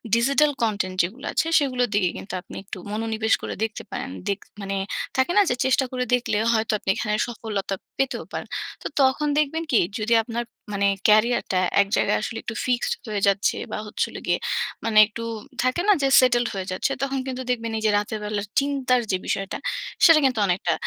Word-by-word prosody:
Digital 275 Hz, +5 st, +3 dB
content 205 Hz, -5 st, 0 dB
যেগুলো 230 Hz, +11 st, -5 dB
আছে, 320 Hz, -, +1 dB
সেগুলোর 255 Hz, -4 st, 0 dB
দিকে 195 Hz, -3 st, +2 dB
কিন্তু 190 Hz, -, -8 dB
আপনি 180 Hz, -, -12 dB
একটু 195 Hz, -, -7 dB
মনোনিবেশ 220 Hz, 0 st, 0 dB
করে -, -, -4 dB
দেখতে 220 Hz, -1 st, -3 dB
পারেন। 250 Hz, +2 st, -4 dB, 0.2 s
দেক 200 Hz, 0 st, 0 dB, 0.2 s
মানে 195 Hz, 0 st, -3 dB, 0.4 s
থাকে 260 Hz, +6 st, +2 dB
না? -, -, +8 dB
যে 245 Hz, -, +1 dB
চেষ্টা 265 Hz, +1 st, +3 dB
করে 250 Hz, -1 st, -1 dB
দেখলে 245 Hz, -4 st, +1 dB, 0.2 s
হয়তো, 220 Hz, 0 st, +1 dB
আপনি -, -, -5 dB
এখানে 210 Hz, -2 st, -1 dB
সফলতা 210 Hz, -4 st, -3 dB, 0.2 s
পেতেও 270 Hz, 0 st, -1 dB
পারেন। -, -, -5 dB, 0.3 s
তো -, -, -3 dB
তখন 270 Hz, +3 st, +3 dB
দেখবেন 305 Hz, +2 st, +1 dB
কি? 240 Hz, -, +5 dB, 0.2 s
যদি 220 Hz, +2 st, +1 dB
আপনার 235 Hz, +1 st, -3 dB, 0.3 s
মানে 200 Hz, 0 st, +1 dB, 0.2 s
ক্য়ারিয়ারটা 215 Hz, -2 st, +3 dB, 0.2 s
এক 200 Hz, -, 0 dB
জায়গায় -, -, +2 dB
আসলে 225 Hz, +1 st, -4 dB
একটু 235 Hz, -, -5 dB
ফিক্সড 245 Hz, -2 st, +1 dB, 0.2 s
হয়ে 205 Hz, -2 st, -2 dB
যাচ্ছে 200 Hz, 0 st, +2 dB, 0.2 s
বা -, -, -2 dB
হচ্ছে 210 Hz, -, -1 dB
হলো -, -, -8 dB
গিয়ে, -, -, +2 dB, 0.5 s
মানে 225 Hz, -1 st, +1 dB
একটু 230 Hz, +2 st, -8 dB, 0.4 s
থাকে 255 Hz, +7 st, +1 dB
না? 415 Hz, -, +7 dB
যে 275 Hz, -, +3 dB
সেটেলড 240 Hz, -1 st, +3 dB
হয়ে 190 Hz, -1 st, -3 dB
যাচ্ছে। 185 Hz, +8 st, -1 dB
তখন 270 Hz, 0 st, -1 dB
কিন্তু 260 Hz, -1 st, -4 dB
দেখবেন, 230 Hz, -2 st, -1 dB
এইযে 220 Hz, 0 st, +1 dB
রাতের 210 Hz, +1 st, -2 dB
বেলার 210 Hz, -1 st, -2 dB
চিন্তার 270 Hz, -3 st, +1 dB
যে 185 Hz, -, +2 dB
বিষয়টা, 195 Hz, 0 st, -2 dB, 0.5 s
সেটা 330 Hz, -2 st, +8 dB
কিন্তু 255 Hz, -4 st, +2 dB
অনেকটা 180 Hz, -2 st, +1 dB
230 Hz, 190 wpm, -24 LUFS, 210-260 Hz, 0.5 s, না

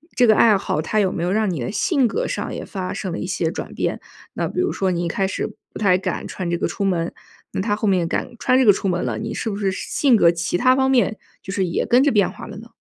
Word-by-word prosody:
这 250 Hz, -, +5 dB
个 215 Hz, -, +6 dB
爱 220 Hz, -1 st, +6 dB
好， 155 Hz, -4 st, -2 dB
它 215 Hz, +6 st, 0 dB
有 190 Hz, -3 st, +2 dB
没 170 Hz, -, -3 dB
有 180 Hz, -, 0 dB
让 215 Hz, 0 st, +1 dB
你 170 Hz, -6 st, -3 dB
的 120 Hz, -, -3 dB
性 270 Hz, -, +2 dB
格 -, -, -2 dB
上 -, -, -3 dB
也 -, -, -5 dB
发 185 Hz, -2 st, -5 dB
生 190 Hz, -, -4 dB
了 170 Hz, -, -3 dB
一 -, -, -3 dB
些 175 Hz, -3 st, -1 dB
转 -, -, -6 dB
变？ -, -, -2 dB, 0.3 s
那 -, -, -2 dB
比 -, -, -4 dB
如 370 Hz, -, 0 dB
说 190 Hz, -1 st, 0 dB
你 175 Hz, -1 st, -1 dB
一 -, -, -1 dB
开 190 Hz, +3 st, 0 dB
始 -, -, -3 dB, 0.3 s
不 -, -, -7 dB
太 185 Hz, -4 st, +4 dB
敢 190 Hz, -, -3 dB
穿 185 Hz, -3 st, -4 dB
这 175 Hz, -, +1 dB
个 -, -, -1 dB
出 200 Hz, -, -3 dB
门， 175 Hz, -3 st, 0 dB, 0.4 s
那 -, -, -2 dB
她 205 Hz, 0 st, 0 dB
后 215 Hz, 0 st, -2 dB
面 180 Hz, -3 st, +2 dB
敢 170 Hz, -, -2 dB
穿 255 Hz, -, +2 dB
这 260 Hz, -, +4 dB
个 205 Hz, -, +8 dB
出 195 Hz, -, -2 dB
门 180 Hz, -1 st, 0 dB
了， -, -, -2 dB
你 220 Hz, 0 st, -4 dB
是 225 Hz, -, -3 dB
不 200 Hz, -, -3 dB
是 195 Hz, -2 st, 0 dB
性 255 Hz, +5 st, +1 dB
格 170 Hz, -5 st, +5 dB
其 170 Hz, +1 st, -2 dB
它 255 Hz, +6 st, +4 dB
方 265 Hz, 0 st, +2 dB
面， 240 Hz, -4 st, +2 dB, 0.2 s
就 190 Hz, -, -7 dB
是 195 Hz, -1 st, 0 dB
也 170 Hz, -, -1 dB
跟 245 Hz, +2 st, +5 dB
着 285 Hz, -, +3 dB
变 205 Hz, -2 st, +2 dB
化 -, -, -10 dB
了 -, -, -9 dB
呢？ -, -, -12 dB
195 Hz, 320 characters per minute, -21 LUFS, 180-225 Hz, 0.4 s, 个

